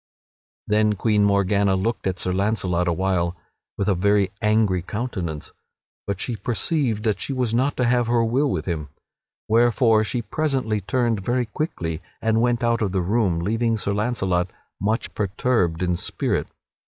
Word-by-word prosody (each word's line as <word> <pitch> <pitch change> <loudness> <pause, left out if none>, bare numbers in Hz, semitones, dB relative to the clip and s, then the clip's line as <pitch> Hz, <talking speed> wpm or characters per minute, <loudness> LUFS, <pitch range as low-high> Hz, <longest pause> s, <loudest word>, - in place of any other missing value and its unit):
Then 105 0 +2
Queen 105 0 +2
Morgana 100 0 +3
looked 105 +3 -1
at 95 -1 -1
Sir 90 0 -2
Launcelot 95 -3 0
awhile 85 0 0 0.4
with 100 - -1
a 100 - +4
very 100 +1 +2
angry 105 -4 +2
countenance, 90 -7 -4 0.6
but 100 -1 -2
she 120 - -2
perceived 115 +1 -1
that 105 -4 0
she - - -3
was 125 -4 -1
not 130 +4 +1
to 125 - +1
have 120 -1 +2
her 120 -1 +2
will 135 +6 +1
with 80 - -2
him, 80 -5 -3 0.6
wherefore 115 -1 +4
she 120 +2 -2
presently 130 -4 -1
turned 115 -1 0
very 120 +3 0
quickly 90 - -3 0.2
and 110 0 +1
went 120 0 +1
out 115 0 +2
of 100 -3 0
the 95 - +1
room, 95 -3 +1
leaving 115 +4 0
Sir 100 - -2
Launcelot 95 -5 0 0.3
much 110 +4 -1
perturbed 95 -4 0
in 90 -1 +1
spirit. 85 - -1
105 Hz, 160 wpm, -23 LUFS, 95-120 Hz, 0.6 s, a